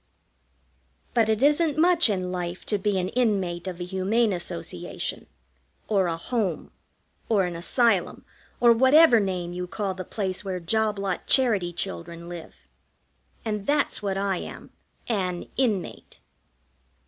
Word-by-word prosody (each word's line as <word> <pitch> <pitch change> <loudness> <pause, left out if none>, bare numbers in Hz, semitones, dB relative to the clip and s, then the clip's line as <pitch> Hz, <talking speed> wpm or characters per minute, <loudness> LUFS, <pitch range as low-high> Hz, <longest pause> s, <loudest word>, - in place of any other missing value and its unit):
But 225 -2 +3
it 220 +3 +1
isn't 300 +1 +3
much 340 -3 +5
in 185 -3 -1
life 180 -1 -4
to 210 - 0
be 200 0 0
an 185 0 -1
inmate 195 -8 0
of 180 -1 -5
a - - -3
Humane 195 +4 +1
Association, 175 - -4 0.6
or 195 -4 +2
a 165 -1 -2
Home, 195 -1 -2 0.6
or 205 -4 +3
an 175 -1 -4
Asylum, 200 +3 +1 0.3
or 240 -1 +7
whatever 260 +2 +6
name 180 -3 -2
you 180 0 -4
call 195 +1 -3
the 185 0 -6
place 190 0 -3
where 190 -2 -3
job 215 +4 0
lot 195 -2 -3
charity 215 -10 +3
children 170 -1 -5
live. 175 -2 -10 0.8
And 210 -2 -3
that's 290 -4 +1
what 195 -2 -2
I 195 -1 0
am, - - -8 0.4
an 185 -6 -2
Inmate. 220 -9 -2
195 Hz, 140 wpm, -25 LUFS, 180-230 Hz, 0.8 s, or